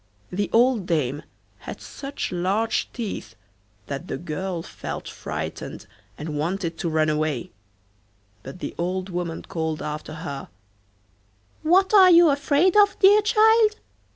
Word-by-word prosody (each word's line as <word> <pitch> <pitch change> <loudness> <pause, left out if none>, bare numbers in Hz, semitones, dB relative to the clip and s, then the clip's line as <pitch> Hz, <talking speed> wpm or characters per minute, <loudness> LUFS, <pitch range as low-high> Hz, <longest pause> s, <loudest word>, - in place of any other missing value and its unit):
The 200 +3 -1
old 235 -4 +3
dame 145 -4 0 0.4
had - - -8
such 280 0 -6
large 195 +6 0
teeth 205 - -6 0.5
that 140 +5 -6
the - - -3
girl 175 +1 -4
felt - - -7
frightened - - -6 0.3
and 150 0 -5
wanted 170 +1 -2
to 170 - -1
run 155 -1 +2
away, 155 -4 -1 0.9
but 135 - -9
the - - -4
old 185 +2 -2
woman 175 -2 -4
called 160 -2 -3
after 150 +1 -5
her: 140 -3 -6 1.1
'What 375 +6 +3
are 380 -3 +8
you 340 -2 +7
afraid 285 +6 +2
of, 410 -1 +5
dear 410 +2 +6
child? 440 0 +4
185 Hz, 130 wpm, -24 LUFS, -, 1.1 s, are